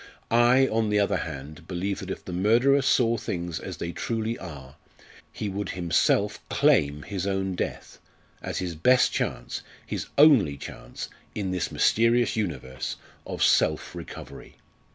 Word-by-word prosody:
I, 120 +3 +5
on 110 -1 +1
the 105 - +2
other 100 - +2
hand, 80 +2 -7
believe 95 +2 -2
that 95 - -7
if - - -6
the 90 - -6
murderer 120 +9 +4
saw 120 -4 +3
things 85 -5 -4
as - - -7
they 85 - -4
truly 115 +3 -2
are, 70 -7 -9 0.6
he 105 - -4
would 100 0 -3
himself 85 -2 +2
claim 75 0 +3
his 95 -1 -3
own 95 -1 -1
death, - - -5 0.4
as - - -4
his 90 -2 -2
best 125 +11 +4
chance, - - -3 0.2
his - - -4
only 130 - +6
chance 60 -2 -8 0.3
in 100 -3 -2
this 90 -2 -2
mysterious 115 +2 +3
universe! 80 - -3 0.3
of - - -2
self - - +2
recovery. - - -9
95 Hz, 150 wpm, -26 LUFS, 85-115 Hz, 0.6 s, only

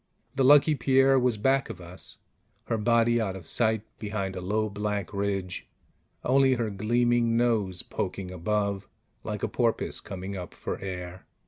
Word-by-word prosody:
The 135 -1 +1
Lucky 145 +3 +7
Pierre 135 0 +4
was 125 -3 +1
back 135 +5 +2
of 90 - -7
us, 90 +1 -7 0.5
her 115 - -1
body 115 +1 +3
out 95 -4 -2
of 95 -4 -9
sight 110 +1 +1 0.2
behind 100 -3 -3
a 90 - -4
low 105 +4 0
black 105 -2 -3
ridge, 100 -2 -2 0.6
only 135 0 +4
her 115 -3 -1
gleaming 120 +3 +2
nose 110 -7 +1
poking 95 -1 -4
above 100 +2 -1 0.4
like - - -4
a - - +2
porpoise - - 0
coming 95 +1 -6
up 90 -3 -7
for - - -4
air. 90 -1 -6
105 Hz, 155 wpm, -27 LUFS, 95-120 Hz, 0.6 s, Lucky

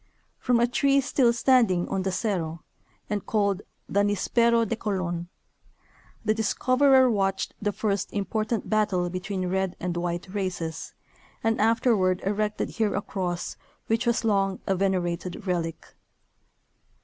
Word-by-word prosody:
From 245 -2 +2
a 240 - +5
tree 275 +3 +3
still 265 -3 +3
standing 230 -7 +3
on 195 - -1
the 190 0 -1
Cerro 175 -5 -2 0.4
and 205 -2 -2
called 200 -3 0 0.3
the 200 - 0
" - - +5
Nispero 230 +3 +2
de 230 - -1
Colon 175 -5 -3 0.5
" - - -31
the 215 - +3
discoverer 255 +4 +4
watched 195 -4 0
the 205 0 0
first 200 -1 -1
impor 215 +2 -2
tant 230 -2 -2
battle 195 -5 +1
between 185 0 -3
red 190 0 -1
and 180 -1 -3
white 175 +1 -2
races, 180 -5 -4 0.5
and 225 -1 +1
afterward 215 -5 +3
erected 210 +1 -1
here 220 -3 -1
a - - 0
cross, 180 -3 -3 0.3
which 225 +2 0
was 235 0 +2
long 195 -3 +1
a 195 - +1
venerated 180 -1 -1
relic. 170 -3 -3
200 Hz, 145 wpm, -26 LUFS, 185-225 Hz, 0.5 s, a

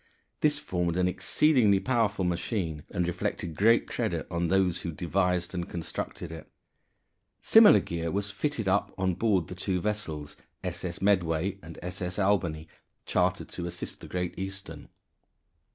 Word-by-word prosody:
This 150 -1 +3
formed 90 -1 -1
an 90 0 +3
exceedingly 110 +1 +3
powerful 110 -5 +1
machine, 85 -3 -2
and 90 -1 -1
reflected 85 -2 -3
great 115 +6 +4
credit - - -2
on 85 0 0
those 95 -1 +2
who 85 - -3
devised 90 +2 0
and 90 -2 -3
constructed 85 -2 -5
it. 80 -1 -9 0.9
Similar - - +7
gear 85 -1 -3
was 100 +3 -1
fitted 110 +2 -2
up 95 +2 +2
on 95 -1 +1
board 95 -3 +1
the - - -7
two 90 0 -1
vessels 80 -8 -3 0.3
S.S. 90 0 -4
Medway 95 -1 +1
and 80 0 -10
S.S. 90 0 -4
Albany 90 -6 +1 0.4
chartered - - 0
to 85 - -5
assist 85 - -6
the - - -10
Great 90 -1 -2
Eastern. 95 -5 -6
90 Hz, 145 wpm, -28 LUFS, 85-100 Hz, 0.9 s, Similar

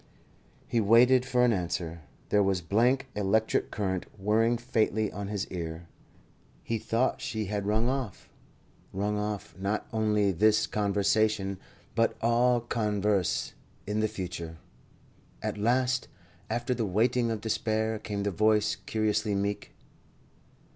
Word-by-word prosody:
He 115 - +1
waited 125 +4 +5
for 125 -2 +3
an 120 - +3
answer. 85 -3 -3 0.3
There 105 - +4
was 95 -2 +2
blank 125 +9 +2
electric 105 +2 +1
current 95 -3 -2
whirring 110 +4 +2
faintly 110 -3 0
on 100 0 -5
his 100 -1 -2
ear. 85 -1 -5 0.8
He 115 -1 -2
thought 115 +4 0
she 110 -1 -3
had 100 0 -3
rung 110 +3 +2
off 130 -6 -3 0.7
rung 105 +2 -1
off 105 -1 -4
not 100 +2 -1
only 105 -2 +2
this 105 +4 +3
conversation, 100 -1 +1 0.3
but 115 0 +1
all 120 +1 +3
converse 105 -5 0 0.3
in 105 +1 -1
the 110 - +2
future. 90 -5 -6 0.9
At - - -3
last, 125 +3 +1 0.4
after 120 +1 -1
the 115 -3 -1
waiting 115 +5 +2
of 110 -1 -2
despair, 110 0 -1
came 100 -1 -4
the 100 - 0
voice, 110 +2 +2
curiously 110 -1 0
meek. 100 +1 -2
105 Hz, 130 wpm, -29 LUFS, 100-115 Hz, 0.9 s, waited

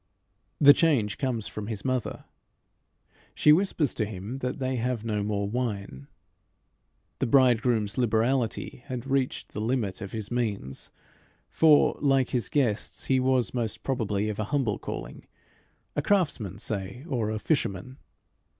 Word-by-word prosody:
The 145 0 +9
change 130 -12 +1
comes 120 -6 -1
from 105 -1 -6
his 110 -3 -5
mother. 130 -3 -2 1.1
She 150 - +6
whispers 165 -5 +1
to - - -1
him 105 +5 -6
that 125 -1 -3
they 130 -2 -1
have 120 -1 -2
no 105 -2 -1
more 100 -1 -1
wine. 100 - -4 1.1
The - - 0
bridegroom's 120 -3 +3
liberality 120 +1 0
had 125 -3 -5
reached 135 -1 -1
the 105 - -4
limit 110 -4 -1
of 95 -1 -6
his 110 -1 -5
means, 105 - -3 0.6
for, 155 -2 +4
like 135 -3 +3
his 120 -6 -1
guests, 120 -8 0
he 130 -1 +2
was, 130 -4 +1
most 115 -4 -3
probably, 110 -6 -1
of 105 -1 -4
a 110 - -1
humble 125 -5 0
calling, - - -7 0.7
a 145 - +1
craftsman, 145 - 0
say, 100 +5 -5
or 120 -8 -1
a 110 - -2
fisherman. 115 - -2
120 Hz, 140 wpm, -27 LUFS, 105-130 Hz, 1.1 s, The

